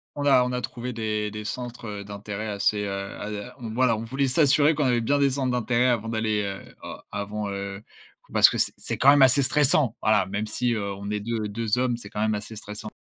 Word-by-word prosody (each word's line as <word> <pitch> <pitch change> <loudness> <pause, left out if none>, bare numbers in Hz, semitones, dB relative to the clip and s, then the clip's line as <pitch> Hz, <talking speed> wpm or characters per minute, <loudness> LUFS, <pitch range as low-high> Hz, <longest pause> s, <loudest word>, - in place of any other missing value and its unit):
On 145 0 -3
a 130 -3 +5
on 125 - -2
a 125 - -2
trouvé 125 +1 -5
des 105 -2 -2
des 105 0 -6
centres, 120 +2 -6
heu, 100 -1 -6
d'intérêt 105 +1 -6
assez, 105 0 0
heu, - - -3
à 105 +3 -6
voilà, 115 0 +1
on 110 - -5
voulait 135 +4 -1
s'assurer 150 +2 +4
qu'on 145 -2 0
avait 120 -2 +2
bien 140 +5 +1
des 140 -1 +4
centres 130 -2 -1
d'intérêt 125 +1 +1
avant 115 -2 0
d'aller, 110 -2 0
heu, 100 -1 -7
oh, - - -7
avant, 105 0 -4
heu, 100 +1 -5 0.5
parce - - +7
que - - -3
c'est - - +1
c'est - - -3
quand 135 - +5
même 145 0 +6
assez 135 +1 +6
stressant 130 -2 +3
voilà, 110 -1 +3
même 105 +2 -3
si, 120 +2 0
heu, 100 -2 -2
on 100 +1 -7
est 105 - -1
deu 110 0 -3
deux 110 +2 -1
hommes, 125 -2 +1
c'est 105 -4 -11
quand 105 - -4
même 110 -1 +1
assez 105 +2 -7
stressant. 105 0 -8
110 Hz, 235 wpm, -25 LUFS, 105-125 Hz, 0.5 s, parce